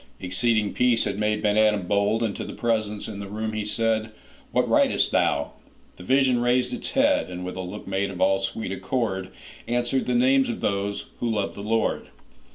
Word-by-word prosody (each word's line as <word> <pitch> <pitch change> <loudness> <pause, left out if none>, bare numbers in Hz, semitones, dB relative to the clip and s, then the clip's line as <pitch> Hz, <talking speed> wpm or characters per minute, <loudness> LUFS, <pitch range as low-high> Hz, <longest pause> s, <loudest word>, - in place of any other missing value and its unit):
Exceeding 105 +3 0
peace 125 -2 +3
had 100 - -3
made 105 0 0
Ben 105 0 +2
Adhem 105 -4 +3
bold, 105 +3 +1
And 105 -3 -1
to - - -4
the - - -7
presence 110 -3 -1
in 105 -2 -7
the 100 - -6
room 110 +2 -4
he 110 0 -2
said,'What 110 0 -2
writest - - +3
thou?'—The 70 +4 -2
vision 130 +4 +3
raised 125 - +2
its 245 - -5
head, 285 - +3
And, 90 0 -6
with 90 - -5
a 95 - -4
look 90 0 -7
made 95 +1 -1
of 95 -2 -7
all 95 +1 +3
sweet 95 +1 -3
accord, 95 -1 -2 0.4
Answered, 120 +2 0
'The 125 - +1
names 130 +2 +4
of 120 - -3
those 100 0 -1
who 120 - -1
love 105 -3 -1
the - - -8
Lord. 110 +2 0
110 Hz, 190 wpm, -25 LUFS, 100-120 Hz, 0.4 s, names